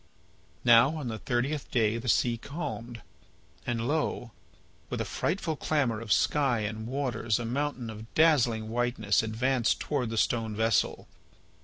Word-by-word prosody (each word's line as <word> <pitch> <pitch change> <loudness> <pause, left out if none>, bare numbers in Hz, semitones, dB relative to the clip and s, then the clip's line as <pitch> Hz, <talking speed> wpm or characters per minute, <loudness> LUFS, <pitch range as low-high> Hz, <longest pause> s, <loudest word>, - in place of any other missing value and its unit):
Now 120 +5 +6
on 145 -6 -4
the 110 -1 -5
thirtieth 130 +5 -2
day 115 -1 +1
the 125 +1 -4
sea 120 +2 +3
calmed. 120 -3 -6 0.6
And 120 -1 -1
lo! 145 -5 -1 0.6
with - - -3
a - - -1
frightful 170 -3 -2
clamour 135 -8 0
of 115 -2 -6
sky 135 -4 +2
and 110 +1 -4
waters 120 -4 -1
a 120 - -4
mountain 130 0 -2
of 110 +1 -10
dazzling 125 -9 +3
whiteness 120 -3 +1
advanced 115 +2 0
towards 135 -6 -2
the 115 - -4
stone 110 -1 0
vessel. 110 0 +1
120 Hz, 145 wpm, -29 LUFS, 110-135 Hz, 0.6 s, Now